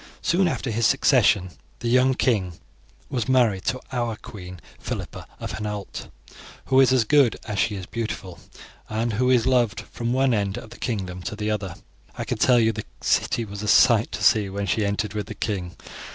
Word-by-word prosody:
Soon 180 Hz, +2 st, +2 dB
after 135 Hz, -6 st, -2 dB
his 115 Hz, +1 st, +2 dB
succession 95 Hz, -2 st, +3 dB, 0.3 s
the 120 Hz, -, -4 dB
young 130 Hz, +2 st, +4 dB
king 100 Hz, -10 st, +1 dB, 0.5 s
was 130 Hz, -2 st, -3 dB
married 120 Hz, -8 st, +2 dB
to 130 Hz, -, 0 dB
our 120 Hz, -3 st, -1 dB
queen, 90 Hz, -4 st, -10 dB, 0.2 s
Philippa -, -, -6 dB
of -, -, -5 dB
Hainault, 105 Hz, -2 st, -5 dB, 0.6 s
who 130 Hz, 0 st, +3 dB
is 130 Hz, -1 st, +6 dB
as 130 Hz, -3 st, +4 dB
good 135 Hz, +1 st, +3 dB
as 105 Hz, -3 st, -3 dB
she 105 Hz, -, +1 dB
is 95 Hz, -2 st, -6 dB
beautiful, 95 Hz, -7 st, -5 dB, 0.5 s
and 110 Hz, +1 st, -1 dB
who 125 Hz, +4 st, +1 dB
is 125 Hz, -3 st, +4 dB
loved 120 Hz, -4 st, +2 dB
from 120 Hz, 0 st, -4 dB
one 130 Hz, 0 st, +2 dB
end 100 Hz, -2 st, -1 dB
of 110 Hz, -, -9 dB
the 120 Hz, -, -12 dB
kingdom 95 Hz, -6 st, -3 dB
to 105 Hz, -, -5 dB
the 105 Hz, 0 st, -2 dB
other. 100 Hz, -4 st, -3 dB, 0.4 s
I -, -, -2 dB
can -, -, -3 dB
tell 125 Hz, -1 st, +5 dB
you, 110 Hz, -1 st, +3 dB
the -, -, -6 dB, 0.2 s
city 115 Hz, -, +1 dB
was 100 Hz, -1 st, -7 dB
a 105 Hz, -, -4 dB
sight 110 Hz, +1 st, +5 dB
to -, -, -4 dB
see 105 Hz, -3 st, +4 dB
when 100 Hz, +1 st, -3 dB
she 105 Hz, +3 st, 0 dB
entered 100 Hz, +1 st, -2 dB
with 105 Hz, -2 st, -4 dB
the 105 Hz, -, -7 dB
king. 95 Hz, -4 st, -3 dB
110 Hz, 195 wpm, -24 LUFS, 100-125 Hz, 0.6 s, is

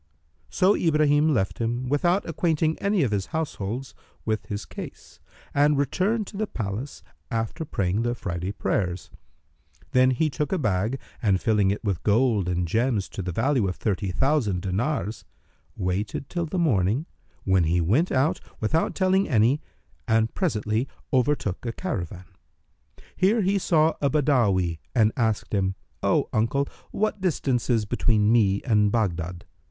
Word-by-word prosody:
So 185 Hz, -, +3 dB
Ibrahim 150 Hz, -1 st, +3 dB
left 95 Hz, -9 st, 0 dB
him 120 Hz, +2 st, -1 dB
without 175 Hz, +8 st, +1 dB
acquainting 160 Hz, -1 st, +1 dB
any 200 Hz, -4 st, +2 dB
of 120 Hz, -, 0 dB
his 100 Hz, -2 st, -1 dB
household 135 Hz, -5 st, -4 dB, 0.3 s
with 110 Hz, -3 st, -2 dB
his 105 Hz, +1 st, -4 dB
case, -, -, -10 dB, 0.3 s
and 145 Hz, 0 st, +3 dB
returned 190 Hz, -, 0 dB
to 200 Hz, -, -9 dB
the 215 Hz, +1 st, -1 dB
palace, 110 Hz, -, -5 dB, 0.3 s
after 115 Hz, +8 st, -2 dB
praying 100 Hz, -5 st, -1 dB
the 120 Hz, +1 st, 0 dB
Friday 90 Hz, -4 st, -4 dB
prayers. 90 Hz, -3 st, -2 dB, 0.8 s
Then 130 Hz, 0 st, +5 dB
he 130 Hz, +5 st, +1 dB
took 150 Hz, +1 st, -3 dB
a 190 Hz, -, +1 dB
bag 110 Hz, -, 0 dB, 0.2 s
and 100 Hz, -5 st, +2 dB
filling 105 Hz, -3 st, +2 dB
it 100 Hz, -, -2 dB
with 100 Hz, -5 st, -1 dB
gold 105 Hz, -3 st, +2 dB
and 90 Hz, -1 st, 0 dB
gems 115 Hz, +1 st, +1 dB
to -, -, -5 dB
the 90 Hz, -1 st, -3 dB
value 120 Hz, -, +1 dB
of 90 Hz, -, -2 dB
thirty 100 Hz, -2 st, -1 dB
thousand 115 Hz, -, +1 dB
dinars, 110 Hz, +4 st, -2 dB, 0.5 s
waited 100 Hz, +7 st, -2 dB
till 170 Hz, -2 st, -2 dB
the 170 Hz, -, -3 dB
morning, 125 Hz, -, +2 dB, 0.4 s
when 95 Hz, -3 st, +3 dB
he 85 Hz, +3 st, +2 dB
went 115 Hz, -, +2 dB
out, 135 Hz, +4 st, +2 dB, 0.2 s
without 160 Hz, +10 st, 0 dB
telling 190 Hz, +1 st, +2 dB
any, 120 Hz, +3 st, +3 dB, 0.5 s
and 110 Hz, 0 st, +2 dB
presently 115 Hz, -, 0 dB, 0.3 s
overtook 125 Hz, -7 st, +1 dB
a 120 Hz, -, -2 dB
caravan. 95 Hz, -, -5 dB, 0.9 s
Here 210 Hz, +5 st, +3 dB
he 195 Hz, +2 st, +2 dB
saw 160 Hz, -3 st, +3 dB
a 140 Hz, -, +3 dB
Badawi 115 Hz, -, +2 dB, 0.2 s
and 110 Hz, -3 st, +4 dB
asked 110 Hz, -5 st, -1 dB
him, 95 Hz, -1 st, +1 dB, 0.3 s
"O -, -, +2 dB
uncle, 115 Hz, +6 st, +1 dB, 0.2 s
what 210 Hz, -1 st, -1 dB
distance 140 Hz, -10 st, 0 dB
is 115 Hz, -3 st, +2 dB
between 105 Hz, 0 st, +2 dB
me 100 Hz, -4 st, +3 dB
and 105 Hz, -4 st, +3 dB
Baghdad?" 90 Hz, -6 st, -2 dB
115 Hz, 150 wpm, -25 LUFS, 100-150 Hz, 0.9 s, Then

